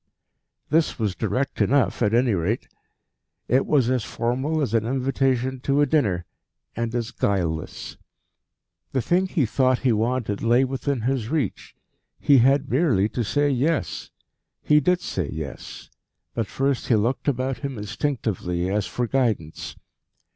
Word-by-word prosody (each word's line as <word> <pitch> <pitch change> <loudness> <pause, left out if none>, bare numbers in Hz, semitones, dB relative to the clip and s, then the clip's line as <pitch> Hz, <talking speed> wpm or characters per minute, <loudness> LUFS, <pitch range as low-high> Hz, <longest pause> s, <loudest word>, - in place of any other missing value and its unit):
This 160 +1 +2
was 105 -5 -1
direct 130 - -2
enough 140 -2 +2
at 105 -3 +3
any 120 0 +3
rate. 95 +6 -1 0.8
It 130 +3 +2
was 135 -6 +3
as 125 -3 +1
formal 130 +9 -1
as 135 -7 -1
an 115 -2 +3
invitation 130 +1 0
to 140 +3 +1
a 145 - +5
dinner, 105 - +1 0.5
and 115 +1 -2
as 115 -2 -2
guileless. 85 -6 -2 1.0
The 130 - +1
thing 180 +8 +2
he 165 -7 +1
thought 130 +2 +2
he 125 - +5
wanted 115 -1 0
lay 120 +3 +4
within 135 0 -2
his 120 -2 -1
reach. 145 - -2 0.4
He 140 -2 +5
had 135 +3 +3
merely 125 - +2
to 120 - -2
say 145 +6 +1
yes. 145 +5 -1 0.5
He 150 0 +5
did 180 +5 +1
say 90 - -3
yes; 80 -3 -7 0.4
but 115 -3 -2
first 135 -1 -1
he 120 - +4
looked 115 +7 0
about 130 -1 0
him 140 -4 -5
instinctively, 105 -5 -2
as 105 0 0
for 125 - -2
guidance. 115 - -1
125 Hz, 145 wpm, -24 LUFS, 110-135 Hz, 1.0 s, a